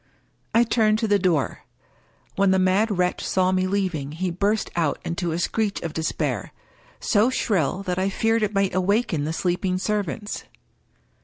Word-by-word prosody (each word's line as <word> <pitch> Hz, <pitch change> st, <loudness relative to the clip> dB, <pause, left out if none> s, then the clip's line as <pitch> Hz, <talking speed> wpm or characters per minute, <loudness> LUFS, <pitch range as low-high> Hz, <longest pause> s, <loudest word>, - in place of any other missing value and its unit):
I 230 Hz, -, +6 dB
turned 220 Hz, -2 st, +2 dB
to 225 Hz, 0 st, -1 dB
the 205 Hz, -1 st, +3 dB
door. 170 Hz, -7 st, +1 dB, 0.8 s
When 195 Hz, 0 st, +3 dB
the 190 Hz, -, +4 dB
mad 190 Hz, +3 st, +2 dB
wretch 180 Hz, 0 st, 0 dB
saw 185 Hz, -1 st, +2 dB
me 185 Hz, 0 st, +1 dB
leaving 180 Hz, -8 st, -2 dB
him -, -, -10 dB
he 185 Hz, 0 st, -1 dB
burst 200 Hz, +5 st, 0 dB
out 160 Hz, -4 st, +1 dB
into 170 Hz, 0 st, -2 dB
a 160 Hz, -, -1 dB
screech 205 Hz, +3 st, -1 dB
of 165 Hz, -2 st, -4 dB
despair 160 Hz, -1 st, -2 dB, 0.2 s
— -, -, -30 dB
so 215 Hz, +2 st, +3 dB
shrill 195 Hz, -, 0 dB
that 180 Hz, -2 st, -2 dB
I 190 Hz, +1 st, +1 dB
feared 225 Hz, +3 st, +1 dB
it 210 Hz, -1 st, +1 dB
might 195 Hz, -1 st, +1 dB
awaken 185 Hz, -4 st, +1 dB
the 155 Hz, -, -2 dB
sleeping 180 Hz, +2 st, 0 dB
servants. 205 Hz, +1 st, -3 dB
190 Hz, 175 wpm, -24 LUFS, 175-210 Hz, 0.8 s, I